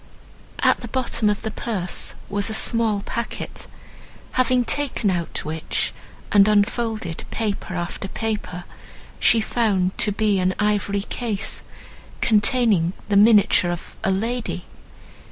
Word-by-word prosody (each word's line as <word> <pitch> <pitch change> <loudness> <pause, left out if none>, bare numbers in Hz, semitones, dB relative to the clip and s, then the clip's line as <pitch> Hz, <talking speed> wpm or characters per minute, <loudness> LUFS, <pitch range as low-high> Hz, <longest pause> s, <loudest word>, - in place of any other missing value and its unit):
At - - +4
the - - -7
bottom 240 -4 0
of 205 - -2
the 220 - -3
purse 200 -5 -1
was 205 +1 -1
a 220 - 0
small 225 -3 +2
packet, 235 0 -5 0.6
having 255 -1 +2
taken 245 -7 +1
out 175 -2 -3
which, 155 +1 -2 0.4
and 200 -1 +6
unfolded 215 -3 0
paper 205 -4 -3
after 175 +2 -4
paper, 205 -4 -4 0.6
she 230 - +5
found 200 -5 0
to 210 - +4
be 205 -1 +1
an 185 0 +1
ivory 205 -1 0
case, 220 -2 -2 0.6
containing 210 -5 +3 0.2
the 205 - +1
miniature 205 -3 +5
of 175 -1 -6
a—lady! 220 0 -1
210 Hz, 120 wpm, -22 LUFS, 190-230 Hz, 0.6 s, and